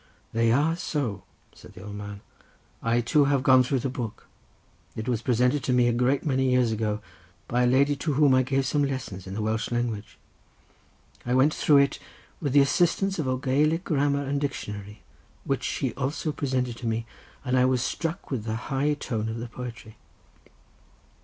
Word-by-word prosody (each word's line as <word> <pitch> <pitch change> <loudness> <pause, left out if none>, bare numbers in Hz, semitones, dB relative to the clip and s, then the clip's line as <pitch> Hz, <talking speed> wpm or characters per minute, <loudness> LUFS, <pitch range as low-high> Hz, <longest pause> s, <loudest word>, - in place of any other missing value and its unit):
"They 115 0 +3
are 150 +7 +3
so," 135 - -3 0.3
said - - -15
the 90 -1 -11
old 105 0 -7
clerk. 105 0 -7 0.6
"I 115 +1 +2
too 140 +5 +3
have 140 -2 +2
gone 130 -1 +6
through 125 0 0
the - - -1
book; 115 -4 -6 0.7
it 110 +2 -5
was 120 -3 0
presented 125 +3 +2
to 130 - +1
me 125 -1 +4
a 120 - +2
great 125 +3 +1
many 130 -3 +1
years 125 -2 +3
ago 110 -1 -1 0.5
by 125 +1 +2
a - - +4
lady 140 +3 +3
to 150 +1 -1
whom 140 -1 +4
I 130 - +5
gave 135 +1 0
some 145 +2 +1
lessons 130 -9 -4
in 95 - -6
the 110 - -2
Welsh 110 +1 -1
language. 120 -3 -3 1.1
I 125 +1 0
went 140 +4 +4
through 150 - +4
it 140 0 +3 0.4
with 145 -5 -1
the 145 - +7
assistance 175 +6 +2
of 150 - -1
a 130 0 0
Gaelic 150 +6 +1
grammar 145 -3 +1
and 140 +1 -1
dictionary 105 -7 -5 0.4
which - - -1
she - - -2
also 150 +4 -2
presented 130 -4 -2
to 120 - -5
me, 115 +1 -1 0.4
and 125 0 +1
I 125 0 +4
was 130 -1 +2
struck 165 -2 -3
with 115 -5 -2
the 110 -1 -2 0.2
high 145 +2 +1
tone 110 -6 -3
of 110 - -4
the 115 +1 -5
poetry." 115 -2 -8
130 Hz, 190 wpm, -26 LUFS, 115-140 Hz, 1.1 s, the